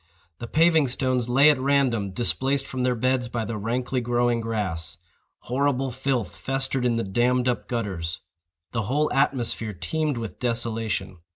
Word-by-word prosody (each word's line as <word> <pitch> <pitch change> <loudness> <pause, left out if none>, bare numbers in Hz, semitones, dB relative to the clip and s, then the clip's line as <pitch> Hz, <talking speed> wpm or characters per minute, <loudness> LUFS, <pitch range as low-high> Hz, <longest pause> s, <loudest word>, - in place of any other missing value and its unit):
The 115 - -6
paving 160 +1 +4
stones 130 -1 0
lay 140 +5 +7
at 145 - -1
random, 130 -7 +2
displaced 130 +7 0
from 130 -2 -4
their 125 0 +2
beds 130 +1 +1
by 120 -1 -3
the 115 +1 -4
rankly 125 +4 -1
growing 120 0 +1
grass. 105 -8 -2 0.4
Horrible 135 0 0
filth 130 -6 -2
festered 135 -1 -1
in 120 -1 +2
the 115 - 0
dammed 125 +5 +1
up 125 - -1
gutters. 95 -7 -3 0.5
The 120 - -1
whole 150 +3 +1
atmosphere 120 -5 0
teemed 150 - -2
with 115 -2 -6
desolation. 115 -6 -1
120 Hz, 155 wpm, -25 LUFS, 115-135 Hz, 0.5 s, lay